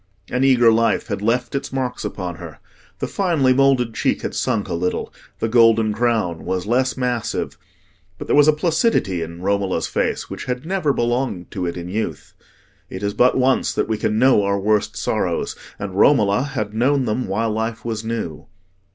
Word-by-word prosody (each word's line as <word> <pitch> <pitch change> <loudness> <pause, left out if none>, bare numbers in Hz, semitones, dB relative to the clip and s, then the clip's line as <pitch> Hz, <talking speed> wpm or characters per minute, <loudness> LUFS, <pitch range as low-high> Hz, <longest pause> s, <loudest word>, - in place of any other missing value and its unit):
An 125 +1 +1
eager 125 -4 +5
life 115 +1 +1
had 100 -2 -3
left 120 +4 0
its 140 - -3
marks 130 -2 -3
upon 90 -3 -5
her: - - -10 0.4
the - - -3
finely 160 -10 +2
moulded 130 -3 +3
cheek - - 0
had - - -3
sunk - - -1
a - - -4
little, 90 +2 -2 0.2
the 115 - -1
golden 115 -2 +4
crown 110 -7 0
was 90 -1 -2
less 130 +4 +1
massive; 125 -3 -2 0.6
but - - -7
there - - +1
was 145 0 +6
a - - +8
placidity 155 - +1
in 85 +2 -7
Romola's 100 -1 0
face - - -1
which - - -7
had 125 +2 -3
never 180 -4 0
belonged 120 -7 -1
to 90 -2 -3
it 85 - -4
in 85 0 -6
youth. 105 +5 -4 0.6
It 95 +2 -7
is 100 0 -1
but 125 +4 +3
once 130 0 +2
that - - -1
we 110 -1 -2
can 105 - 0
know 125 -2 +5
our 100 0 0
worst 105 +1 0
sorrows, - - -1 0.2
and 100 -2 -5
Romola 105 0 +4
had 105 -3 -2
known 130 +4 +2
them 125 +3 -1
while 110 +4 -1
life 110 +1 -3
was 110 -2 -3
new. 110 -9 -4
115 Hz, 185 wpm, -21 LUFS, 100-130 Hz, 0.6 s, a